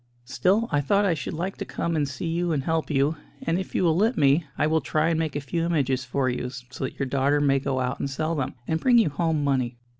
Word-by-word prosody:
Still, 190 - +1
I 145 -1 +2
thought 200 +8 +2
I 185 - +3
should 155 0 -4
like 180 +4 -3
to - - -3
come 170 0 -2
and 145 -3 0
see 130 +5 -5
you 170 +1 0
and 140 -3 -1
help 160 +1 -1
you; 145 +2 +1 0.3
and 165 +2 0
if 190 - -6
you - - +2
will 165 -3 +3
let 220 +7 +2
me, 145 +3 +4
I - - +2
will 160 +1 +2
try 155 +3 +1
and 165 -1 +1
make 160 -3 -2
a - - 0
few 165 +5 -2
images 135 -6 0
for 130 +1 0
you, 125 0 -2
so 130 +1 -7
that - - -7
your 140 - -1
daughter 140 +2 +1
may 140 -1 +3
go 135 -1 -1
out 125 +1 -2
and 140 - -2
sell 155 +4 -2
them, 140 -5 -2
and 160 - 0
bring 245 +4 +4
you 225 -8 +4
home 160 -1 0
money. 130 -4 0
150 Hz, 270 wpm, -25 LUFS, 135-165 Hz, 0.3 s, me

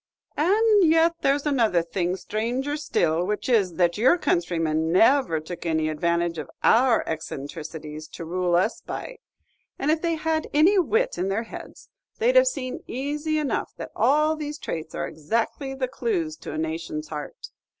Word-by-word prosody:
"And 410 +2 +4
yet 330 +1 +4
there's 280 +1 +1
another 230 - +2
thing 175 +1 -1
stranger 240 +9 -2
still, 170 - 0
which 210 +3 -2
is, 200 -9 +2
that 175 +2 +1
your 260 +10 +5
countrymen 165 - 0
never 195 - +4
took 165 +3 -8
any 160 -2 0
advantage 170 +1 0
of 155 - -7
our 240 0 +4
eccentricities, 155 0 -6
to 165 - -8
rule 175 +1 0
us 190 +6 +1
by; - - -6 0.6
and 290 - +1
if 315 0 +1
they 335 -1 0
had 320 0 -1
any 360 +7 +5
wit 460 +7 +1
in 185 - 0
their 210 +4 -1
heads, 225 - -11 0.3
they 465 +2 +3
'd - - -7
have - - +7
seen, 255 - -3
easy 295 +4 -2
enough, 300 -3 -2
that - - -7
all 305 +3 +3
these 300 -1 -5
traits 160 - -5
are - - -2
exactly 230 - -2
the 265 -1 -1
clews 330 - -2
to - - -8
a 155 - -5
nation's 155 -1 -4
heart. 150 -2 -7
225 Hz, 170 wpm, -25 LUFS, -, 0.6 s, have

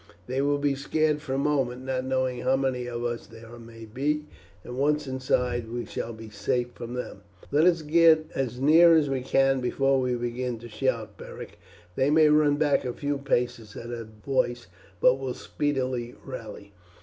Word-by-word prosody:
They 130 +5 -1
will 145 +1 +2
be 145 0 +1
scared 150 +2 0
for 135 -3 -3
a - - 0
moment, 135 -3 0
not 130 -1 -2
knowing 130 -1 0
how 135 - +2
many 130 -2 -1
of 120 -1 -4
us 120 -1 -3
there 115 +1 -12
may 115 -1 -11
be, 145 +7 -1 0.4
and 125 - -7
once 150 +3 +1
inside 125 -3 -1
we 120 0 -3
shall 115 - -5
be 110 -1 -10
safe 120 +4 -1
from 120 +1 -7
them." 125 -5 -6 0.3
"Let 150 +3 +4
us 170 -3 +3
get 160 0 +5
as 125 -2 -2
near 165 +4 +7
as 150 -3 +2
we 130 -1 -1
can 135 +1 +2
before 135 +2 +2
we 125 -1 0
begin 120 0 -3
to 120 +1 -10
shout, 110 -3 -2
Beric. - - -10 0.4
They 135 +2 +2
may 155 0 +5
run 150 -1 +4
back 145 -1 +2
a 125 -2 -3
few 145 +1 -2
paces 120 -5 -1
at 120 +1 -7
our 115 -2 -6 0.2
voice, 120 -3 0 0.3
but 125 +6 +4
will 130 -2 -4
speedily 130 -4 -2
rally." 110 -6 -8
130 Hz, 185 wpm, -26 LUFS, 120-145 Hz, 0.4 s, near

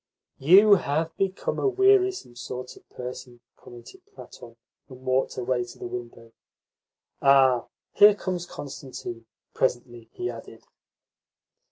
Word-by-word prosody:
"You 195 +9 +7
have 160 +1 -2
become 195 0 -2
a - - +1
wearisome 385 - +2
sort 125 +1 -7
of - - -20
person," 125 -1 -9 0.2
commented 120 - -14
Platon, 415 - -13 0.3
and 130 -1 -13
walked 130 +1 0
away 125 0 -1
to 120 - -12
the - - -8
window. 120 -1 -8 0.9
"Ah, 135 -3 +4 0.3
here 205 0 +7
comes 180 -3 -4
Constantine," 130 -4 -9 0.3
presently 120 -2 -2
he 365 - -4
added. - - -9
130 Hz, 120 wpm, -25 LUFS, 120-195 Hz, 0.9 s, You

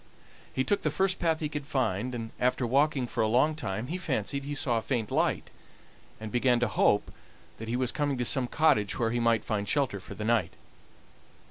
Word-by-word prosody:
He 130 - 0
took 205 +8 0
the 155 - +1
first 190 +6 0
path 165 -2 +1
he 155 - 0
could 145 -1 -6
find, 125 -2 -1
and 115 -1 -5
after 125 0 +1
walking 135 +2 +2
for - - -2
a 110 - +3
long 130 +8 +3
time 110 -7 -4
he 170 +7 -4
fancied 140 - -2
he 145 +1 -4
saw 120 -5 +1
a - - -6
faint 115 -3 -2
light, - - 0 0.7
and 110 -1 -7
began 120 +1 +3
to 120 - +3
hope 105 -1 +2 0.5
that 110 - -6
he 115 - -1
was 125 -1 0
coming 145 -2 -1
to 125 - -1
some 125 +1 +2
cottage 115 -10 +2
where 115 -3 0
he 120 - 0
might 115 -2 +2
find 105 -2 -2
shelter 135 -8 0
for 90 - -10
the 105 - -5
night. 110 -6 +1
125 Hz, 215 wpm, -29 LUFS, 110-145 Hz, 0.7 s, a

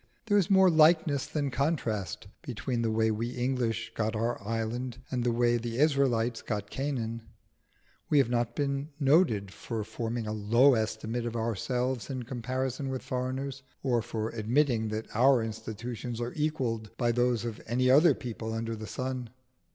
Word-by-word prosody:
There 205 -2 +3
is 180 - 0
more 190 -2 +6
likeness 155 -3 +4
than 145 -3 -2
contrast 120 - -1 0.2
between 125 -4 -3
the 115 - +1
way 110 0 +2
we 115 +2 -2
English 120 -3 -1
got 110 0 -1
our 115 +2 -1
island 115 +3 -3
and 125 -2 0
the 120 - +2
way 120 0 +3
the 115 0 -4
Israelites 130 -6 +2
got 105 -2 -4
Canaan. 120 -5 -2 0.9
We 150 - +4
have 135 - +5
not 120 -1 0
been 140 0 -1
noted 135 - +3
for 115 -3 -4
forming 115 +1 -3
a 105 - -3
low 115 +6 +5
estimate 110 +1 -1
of 120 - -4
ourselves 120 +2 -1
in 130 -2 -3
comparison 130 +2 -3
with 130 -1 -4
foreigners, 130 +2 -3 0.2
or 125 -4 +2
for 110 0 -3
admitting 115 +1 +1
that 110 +1 -3
our 125 0 +5
institutions 115 +2 -5
are 120 0 -3
equalled 130 -8 -1
by 120 -2 +2
those 120 -1 +1
of 115 -2 -5
any 125 +3 +2
other 150 +1 +6
people 110 -2 -5
under 115 0 -2
the 110 0 -7
sun. 130 -2 -4
120 Hz, 165 wpm, -29 LUFS, 115-135 Hz, 0.9 s, more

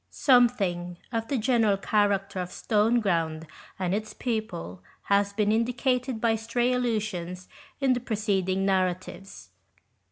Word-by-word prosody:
Something 200 - +2
of 225 -1 -2
the 275 - -1
general 225 -4 +2
character 200 -1 0
of 180 -1 -3
Stoneground 195 -9 +1 0.3
and 185 -1 -1
its 215 +1 -3
people 215 - -4 0.2
has 200 0 +2
been 210 0 +1
indicated 250 +2 0
by 225 -1 +2
stray 240 +3 0
allusions 210 -7 -2 0.3
in 270 -2 +3
the 245 - -1
preceding 200 -5 -1
narratives. 185 0 -2
210 Hz, 120 wpm, -27 LUFS, 185-235 Hz, 0.3 s, in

